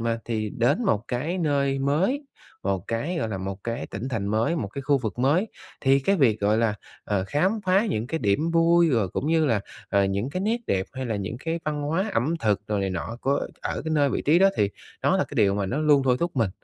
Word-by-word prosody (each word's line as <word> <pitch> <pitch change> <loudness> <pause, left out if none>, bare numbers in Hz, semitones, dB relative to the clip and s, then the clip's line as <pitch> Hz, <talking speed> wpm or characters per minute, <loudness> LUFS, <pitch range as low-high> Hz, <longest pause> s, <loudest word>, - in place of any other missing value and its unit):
mà, 115 0 -1
thì 110 -2 -2
đến 120 - +2
một 110 - +1
cái 150 +9 -2
nơi 140 -4 +1
mới, 170 - +1 0.4
một 95 -2 -1
cái, 120 +11 -2
gọi 125 - -1
là, 100 -3 -3
một 95 +1 -5
cái 115 0 -3
tỉnh 115 +6 -5
thành 110 -6 -2
mới, 110 +10 +1
một 110 -10 -2
cái 140 +7 -6
khu 140 +1 +2
vực 115 -2 -4
mới, 150 - +2 0.3
thì 135 0 +4
cái 195 +9 +2
việc, 115 - +3
gọi 105 +2 +2
là, 115 -2 +2 0.3
ờ, 100 -2 0
khám 180 - +1
phá 190 +4 +3
những 110 - -1
cái 160 - -2
điểm 130 +10 +1
vui 170 0 +4
rồi 115 -7 +2
cũng 135 - -3
như 160 -1 +3
là, 115 -6 +2 0.3
ờ, 100 -1 +3
những 100 +6 -1
cái 185 - -3
nét 220 +3 +1
đẹp 95 -1 0
hay 130 -1 -4
là 110 -3 -1
những 100 +3 -4
cái 165 +1 -2
văn 150 -1 -2
hóa 165 +8 -1
ẩm 140 +8 +1
thực 105 -1 0
rồi 105 -1 0
này 95 -1 -1
nọ 95 +6 -4
của 140 +2 0
ở - - -3
cái 160 - -3
nơi, 145 -2 +3
vị - - -1
trí 155 +4 +4
đó 195 +1 +5
thì 100 - +2 0.3
đó - - +3
là - - +1
cái - - -11
điều 100 -1 +4
mà 100 -1 -1
nó 125 +9 -2
luôn 150 -2 +4
thôi 125 -2 +3
thúc 170 -3 -2
mình. 115 -6 +2
130 Hz, 255 wpm, -25 LUFS, 105-160 Hz, 0.4 s, đó